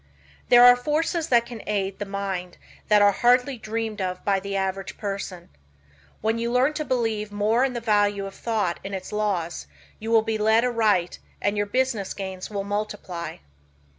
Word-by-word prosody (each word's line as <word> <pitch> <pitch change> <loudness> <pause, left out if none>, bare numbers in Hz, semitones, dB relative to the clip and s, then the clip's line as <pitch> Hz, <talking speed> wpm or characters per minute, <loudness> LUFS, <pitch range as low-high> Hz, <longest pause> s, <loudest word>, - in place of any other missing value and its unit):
There 245 0 +8
are 245 0 +9
forces 310 +5 -1
that 235 -4 +4
can 235 -2 -8
aid 195 -2 -1
the 205 - -4
mind 195 -2 -4 0.3
that 210 -1 +5
are 205 - +6
hardly 250 +4 +2
dreamed 220 -1 -3
of 185 -1 -4
by 195 -1 +2
the 200 +1 -5
average 195 0 -3
person. 195 -3 -5 0.7
When 225 +2 0
you 235 +1 -1
learn 255 +4 +3
to 305 - -2
believe 225 -6 -1
more 215 +4 +2
in 265 -2 0
the 240 - -4
value 205 -3 +2
of 195 - -7
thought 210 -7 -1
and 195 0 -4
its 190 - -7
laws 200 -6 -2 0.3
you 220 - -5
will 225 -1 +5
be 220 -1 -2
led 220 +2 +4
aright 215 -7 +1 0.2
and 205 - 0
your 205 0 0
business 245 -4 -1
gains 190 -2 -6
will 200 -2 -3
multiply. 205 -4 -4
210 Hz, 180 wpm, -24 LUFS, 195-235 Hz, 0.7 s, are